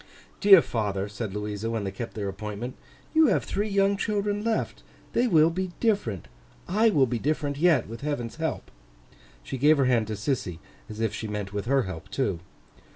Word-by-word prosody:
'Dear 195 -4 +8
father,' 100 -3 -2
said 105 0 -5
Louisa, 105 +2 -3
when 115 -2 -2
they 95 - -3
kept 115 +4 -7
their 105 -2 -3
appointment, 105 +5 -5 0.4
'you 320 -1 +6
have 185 - +2
three 210 +2 -2
young 200 0 +3
children 205 0 -1
left. 225 -1 -1 0.3
They 245 - +3
will 165 -5 +5
be 185 +1 -3
different, 120 - 0 0.4
I 215 +5 +3
will 145 -10 +4
be 120 -1 -2
different 145 0 -1
yet, 160 -5 +3
with 115 +1 -8
Heaven's 140 -5 -3
help.' 160 -2 -3 0.7
She 135 - -5
gave 150 +3 +5
her 135 - +3
hand 120 -4 +2
to 110 - -3
Sissy, 105 - -2 0.3
as 110 +1 -6
if 110 -2 0
she 110 - -4
meant 105 -2 -4
with 100 -1 -3
her 135 +1 +2
help 95 -4 -7
too. 100 -11 -1
125 Hz, 190 wpm, -26 LUFS, -, 0.7 s, Dear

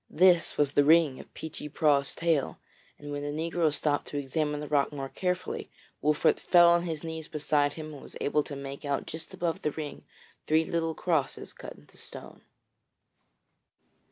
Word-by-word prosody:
This 175 0 +4
was 145 -2 +3
the 145 - +4
ring 155 -3 +5
of - - -12
Peechy 150 -1 -7
Prauw's 140 -2 +2
tale, 165 -5 0 0.4
and 145 0 -8
when 145 0 -3
the 145 - -4
negro 160 +1 0
stooped 145 0 0
to 145 - -4
examine 150 +1 -1
the 150 - -5
rock 145 -1 +2
more 135 -2 -5
carefully, 180 +3 -3 0.3
Wolfert 150 +1 +3
fell 175 -1 +6
on 170 0 +3
his 160 -2 -4
knees 160 -1 -5
beside 145 -2 +1
him 155 0 -7
and 140 - -10
was - - -10
able 150 +1 +2
to 145 - -6
make 140 0 -7
out 140 -1 -1
just 160 0 -7
above 170 -2 -2
the - - +1
ring 150 -1 -6 0.4
three 160 +1 +3
little 165 -1 -1
crosses 160 -7 -1
cut - - -9
in - - -19
the - - -21
stone. - - -10
150 Hz, 185 wpm, -29 LUFS, 145-165 Hz, 0.4 s, fell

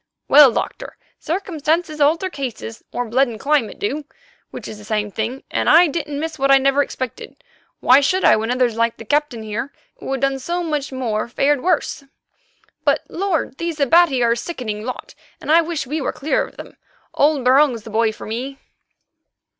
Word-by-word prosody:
Well, 285 -2 +8
Doctor, - - -5 0.2
circumstances 320 -3 -2
alter 320 +6 +3
cases, 250 -5 -6
or 245 - -2
blood 260 +4 +2
and 225 -2 -8
climate 280 -6 0
do, 285 +8 -3 0.4
which - - -8
is 215 - -9
the - - -12
same 210 -1 -2
thing, 230 +6 -4
and - - 0
I 335 +3 +7
didn't 300 -3 -3
miss 320 -1 -5
what 275 0 +1
I 275 - +7
never 275 +1 +2
expected, 260 -3 -6 0.4
why 255 +2 +6
should 370 +7 +1
I - - +7
when 220 +1 -2
others 250 -2 +1
like 230 0 0
the 230 - -10
Captain 290 -2 0
there, 220 +5 -4 0.3
who - - -6
had 270 -2 -2
done 275 0 0
so 345 +6 -3
much 300 -4 -3
more, 235 -5 -2
fared 275 +3 +1
worse? 345 -4 0 0.8
But, - - +2
Lord! 345 -8 -2
these 335 -2 -3
Abati 280 -2 +4
are 235 - +3
a 235 - +1
sickening 235 -7 -5
lot, 255 +2 -7 0.3
and - - -3
I 330 +1 +6
wish 330 -3 -3
we 300 +4 -3
were - - -1
clear 300 - -1
of - - -19
them. - - -11 0.4
Old 285 -3 +2
Barung's 255 -3 +4
the 220 - -10
boy 225 +1 +2
for 215 - -10
me." 255 +5 -5
275 Hz, 190 wpm, -20 LUFS, 235-305 Hz, 0.8 s, Well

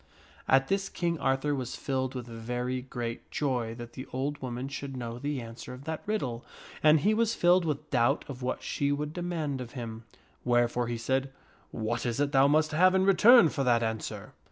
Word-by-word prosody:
At 135 0 +4
this 195 0 0
King 170 -2 -2
Arthur 135 +2 +1
was 130 -3 -3
filled 130 -1 -2
with 125 -2 -4
very 125 +2 -3
great 120 -2 -6
joy 125 -6 -1
that 120 0 -9
the 130 - -8
old 140 +3 -2
woman 125 0 -4
should 140 -1 -6
know 120 -1 -5
the 145 +1 -2
answer 115 +2 -8
to 130 - -13
that 160 +1 -4
riddle, 130 - -2 0.4
and 155 -1 +6
he 210 +3 +3
was 230 +1 +1
filled 175 0 +4
with 150 -3 -3
doubt 125 +2 +2
of 130 -2 -8
what 125 +1 -3
she 140 0 -1
would 150 +1 -2
demand 160 -6 -3
of 120 -1 -8
him, 115 -3 -7 0.4
wherefore 120 0 +2
he 120 0 -2
said, 130 +4 -1 0.2
" - - -32
What 115 +2 -2
is 120 +2 -2
it 145 -1 +1
thou 135 -1 +5
must 155 +2 +3
have 185 +4 +4
in 190 0 +3
return 205 0 +7
for 140 - -2
that 120 -2 +3
answer? 110 -1 -4
135 Hz, 205 wpm, -29 LUFS, 120-150 Hz, 0.4 s, return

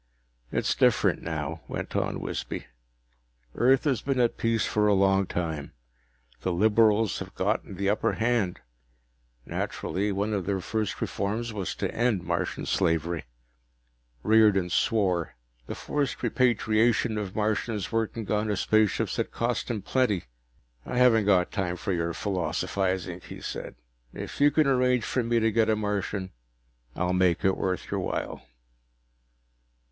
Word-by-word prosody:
"It's - - +1
different - - +3
now," 80 0 -4
went - - -5
on - - -1
Wisby. - - -4 0.9
"Earth 130 +2 +3
has 135 -7 +1
been 135 -2 -1
at 120 -1 +2
peace 115 -1 +1
for 105 0 +1
a 105 - +4
long 95 0 +3
time. 80 -6 -3 0.7
The 95 - -1
liberals 110 +3 +3
have - - -8
gotten 95 - -1
the 100 +2 -2
upper 105 +2 +1
hand. 115 -5 0 0.8
Naturally, 100 +2 -2
one 100 +2 -1
of 95 -3 -2
their 100 -1 0
first 105 +2 -3
reforms 110 +3 -2
was 100 -4 -3
to - - -3
end 115 -6 +1
Martian 85 +1 -2
slavery." 80 0 0 1.0
Riordan 105 -5 +4
swore. 95 -5 +1 0.3
The - - -4
forced 145 -3 -2
repatriation 115 -2 +2
of 100 -3 -5
Martians 110 -1 -1
working 115 -1 -2
on 105 +1 +1
his 105 -3 0
spaceships 110 -2 +2
had - - -1
cost 120 +1 -2
him 110 -4 -3
plenty. 125 -8 +1 0.6
"I 125 - -4
haven't 105 -7 +4
time 95 -4 -1
for 100 - -2
your 85 -1 -1
philosophizing," 95 -1 -2
he - - -8
said. - - -6 0.4
"If - - -6
you 145 - +7
can 155 +1 +3
arrange 125 -3 +3
for 125 - 0
me 115 0 +1
to 115 0 +2
get 110 0 +2
a 110 - +4
Martian, 105 -2 -2 0.6
I'll 90 +1 0
make 90 0 +2
it 95 - +4
worth 90 -2 -2
your - - 0
while." - - -3
105 Hz, 145 wpm, -27 LUFS, 95-115 Hz, 1.0 s, you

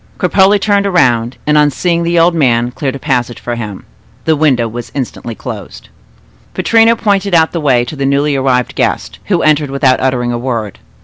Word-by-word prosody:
Cropole 200 +1 +3
turned 200 0 +1
around, 125 -10 +1
and, 150 0 +3
on 150 0 +4
seeing 170 +4 -1
the 170 0 0
old 170 +1 +4
man, 120 -6 +1
cleared 135 +1 -3
a - - -4
passage 125 -4 -2
for 120 - -4
him. 105 -5 -6 0.4
The 160 - +3
window 135 -6 +1
was 120 +1 -7
instantly 120 -3 -5
closed. - - -9 0.7
Pittrino 230 0 +3
pointed 200 -4 0
out 160 -1 +3
the 170 - -3
way 125 -5 +2
to 155 - -7
the 135 -1 -2
newly 140 +1 +1
arrived 130 -2 0
guest, - - -2
who - - 0
entered 150 -2 +2
without 135 -1 +2
uttering 125 -2 0
a 120 - -3
word. 115 -5 -4
140 Hz, 190 wpm, -13 LUFS, 120-170 Hz, 0.7 s, on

